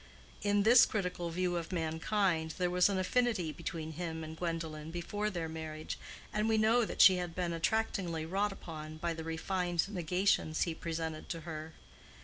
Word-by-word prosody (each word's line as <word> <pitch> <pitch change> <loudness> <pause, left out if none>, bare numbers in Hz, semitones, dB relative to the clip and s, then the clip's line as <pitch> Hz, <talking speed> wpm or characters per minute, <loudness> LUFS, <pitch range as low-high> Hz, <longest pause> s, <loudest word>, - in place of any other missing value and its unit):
In 205 0 +2
this 235 +3 +8
critical 180 -4 -2
view 175 +1 0
of 170 +1 -4
mankind 165 0 0
there 180 -1 +1
was 180 +2 +4
an 195 - 0
affinity 190 -3 +1
between 160 -1 -5
him 160 0 -4
and 160 0 -7
Gwendolen 160 -2 -3
before 205 +5 -2
their 170 -5 -3
marriage, 155 -1 -5 0.3
and 210 +1 +1
we 220 - +3
know 225 +2 +4
that - - 0
she 185 -1 +9
had 175 -2 -4
been 175 -2 -1
attractingly 170 -3 0
wrought 200 +5 0
upon 155 -4 -8
by 170 +1 -1
the 160 0 -6
refined 175 +2 -1
negations 180 -3 +1
he 170 - -1
presented 160 -1 -4
to 165 - -4
her. 160 -1 -6
170 Hz, 170 wpm, -33 LUFS, 160-195 Hz, 0.3 s, she